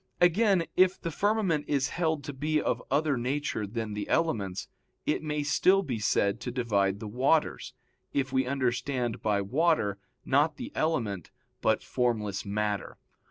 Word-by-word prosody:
Again, 185 +1 +4
if 185 0 +4
the 165 - -4
firmament 190 -4 +1
is 140 -2 +1
held 160 -4 -1
to 145 - -6
be 150 +3 0
of - - -1
other 145 0 +2
nature 125 -3 -2
than 110 0 -4
the 105 0 -4
elements, 100 - 0 0.4
it - - 0
may 150 -1 -2
still 190 +6 +3
be 125 - -3
said 100 0 +1
to 125 - -4
divide 100 -6 0
the 110 - -6
waters, 135 +8 +1 0.4
if 135 -1 -1
we 130 -1 +2
understand 125 -2 -1
by 105 -2 +1
water 125 - +1 0.3
not 145 +4 +2
the 255 +2 -6
element 115 - -1 0.3
but - - +2
formless 110 -5 -1
matter. 105 0 -2
135 Hz, 155 wpm, -29 LUFS, 105-160 Hz, 0.4 s, Again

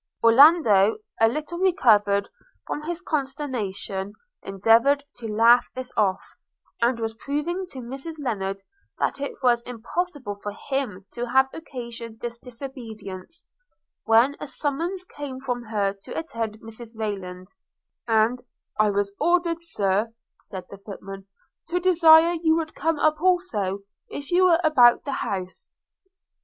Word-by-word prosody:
Orlando, 230 - +6 0.2
a 225 - +6
little 305 +8 -4
recovered 210 - +3 0.4
from 295 - -4
his 345 +2 -4
consternation, 250 - -3 0.3
endeavoured 230 +9 +3
to 235 -2 -6
laugh 230 +3 +5
this 255 0 -6
off, 195 -2 +1 0.6
and 235 0 +2
was 225 -1 -2
proving 300 +10 -3
to 265 -7 -8
Mrs 270 +7 -7
Lennard 195 -8 -3 0.3
that - - -1
it 285 - -2
was 240 -2 +4
impossible 245 - -4
for 205 - -5 0.2
him 250 -9 -2
to 240 0 -4
have 265 +1 +4
occasioned 235 -7 -8
this 235 0 -6
disobedience, 235 - -9 0.6
when 235 +5 +4
a - - -6
summons 335 +7 -3
came 285 -6 -7
for 245 -2 -3
her 205 -3 0
to - - -8
attend 225 -9 -4
Mrs 225 +1 -11
Rayland; 185 -4 -5 0.5
and 225 +2 +2 0.4
'I 215 0 +4
was 200 0 0
ordered, 340 -1 +1
Sir,' 210 - -1 0.3
said 185 -2 -9
the 200 - -10
footman, 195 -1 -9 0.4
'to 350 +2 0
desire 335 -2 +6
you 320 -1 +3
would 320 -1 -2
come 325 -1 -1
up 310 +1 +1
also, 235 - 0 0.3
if 285 +2 -7
you 365 +1 +5
were 340 -2 +5
about 250 -7 +5
the 280 - -3
house.' 185 -2 -5
240 Hz, 135 wpm, -24 LUFS, 210-305 Hz, 0.6 s, Orlando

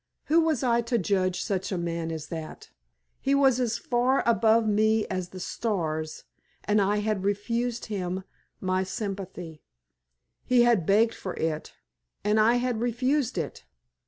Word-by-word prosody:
Who 325 +2 +3
was 315 -5 +1
I 235 -2 +3
to 235 +1 0
judge 185 -2 0
such 195 -3 -2
a 190 - -1
man 170 -1 -3
as 160 -2 -6
that? 160 -2 -7 0.5
He 275 +1 +1
was 270 -3 +4
as 235 -2 0
far 250 +2 +1
above 225 -1 +4
me 215 +1 +3
as 185 -1 -3
the 185 - -9
stars, 160 -7 -3 0.4
and 210 0 +2
I 200 +2 +2
had 210 -2 -1
refused 230 +4 -1
him 190 -3 -3 0.4
my 185 0 0
sympathy. 190 -5 -6 0.8
He 250 -1 +4
had 230 -9 +3
begged 225 +3 +4
for 185 - -6
it, 155 -1 -3 0.5
and 210 +1 +2
I 225 +3 +5
had 245 -2 0
refused 255 +1 0
it! 160 -4 -4
210 Hz, 155 wpm, -27 LUFS, 185-235 Hz, 0.8 s, I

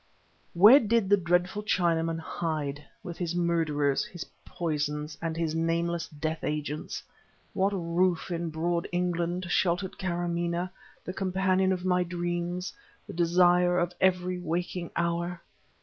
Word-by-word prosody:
Where 210 +10 +9
did 225 -3 +1
the - - +9
dreadful 180 +3 +1
Chinaman 165 -5 +1
hide, 155 -3 -3 0.2
with 175 -4 -7
his 175 -1 -2
murderers, 160 -5 +1
his 175 -2 -7 0.2
poisons, 150 -3 -3
and 165 -1 -3
his 165 -2 -1
nameless 165 +1 0
death 155 +1 -4
agents? 150 0 -3 0.5
What 195 +1 +2
roof 180 -1 0
in 170 -1 -2
broad 170 +2 -1
England 175 0 -1
sheltered 180 +1 0
Kâramaneh, 175 -1 -1 0.3
the 185 - -4
companion 190 0 +1
of 185 -1 -2
my 180 -1 +3
dreams, 175 +1 -3 0.3
the - - -9
desire 175 +1 +4
of 175 0 0
every 180 -1 +2
waking 175 0 -3
hour? 170 +1 -1
175 Hz, 130 wpm, -28 LUFS, 165-180 Hz, 0.5 s, Where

